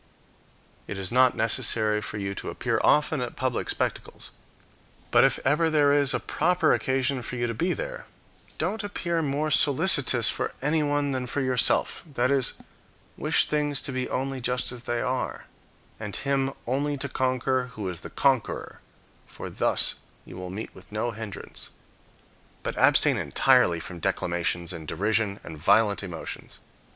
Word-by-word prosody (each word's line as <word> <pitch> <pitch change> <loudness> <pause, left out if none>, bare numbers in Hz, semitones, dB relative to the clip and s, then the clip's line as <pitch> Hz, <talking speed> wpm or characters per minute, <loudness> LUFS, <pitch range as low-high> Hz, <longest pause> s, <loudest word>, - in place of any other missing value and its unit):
It 100 - -5
is 95 -1 -3
not 130 +1 +4
necessary 110 -2 +2
for 105 - -5
you 100 -1 -3
to - - -6
appear - - -1
often 150 -1 +3
at 125 - -4
public 130 -2 -2
spectacles; - - -3 0.8
but - - +6
if - - +3
ever 150 +4 +3
there 145 -2 +4
is 145 -1 +3
a - - 0
proper 180 +3 +2
occasion 130 0 0
for 125 - -6
you 120 -1 -1
to 115 - -2
be 170 +11 0
there, - - -6 0.5
don't 220 0 -2
appear 170 -5 -2
more 150 +1 -1
solicitous 140 - +5
for - - -1
anyone 145 -1 +1
than 130 -1 -3
for 140 - -2
yourself; 130 -2 +1
that 125 -1 +1
is, 135 -2 +2 0.6
wish - - +2
things 145 -2 0
to 140 - -4
be 130 -1 -3
only 135 0 -3
just 125 +1 -1
as 120 -1 -8
they 120 0 -1
are, 130 0 -3 0.5
and 105 -2 -6
him 135 -1 0
only 145 +4 -1
to 140 - -2
conquer 130 -1 0
who 105 -5 -5
is 90 -3 -5
the - - -8
conqueror, 135 -4 0 0.5
for - - -8
thus - - +1 0.3
you - - -11
will 90 0 -6
meet 100 +4 -6
with 95 - -16
no 110 +3 -2
hindrance. 110 -2 -6 0.9
But - - -3
abstain - - +4
entirely 85 -1 +3
from 85 +1 -8
declamations 85 +1 -1
and 80 -3 -8
derision 105 +1 0
and 80 -2 -9
violent 100 +5 +3
emotions. 90 -5 -7
130 Hz, 160 wpm, -26 LUFS, 105-140 Hz, 0.9 s, but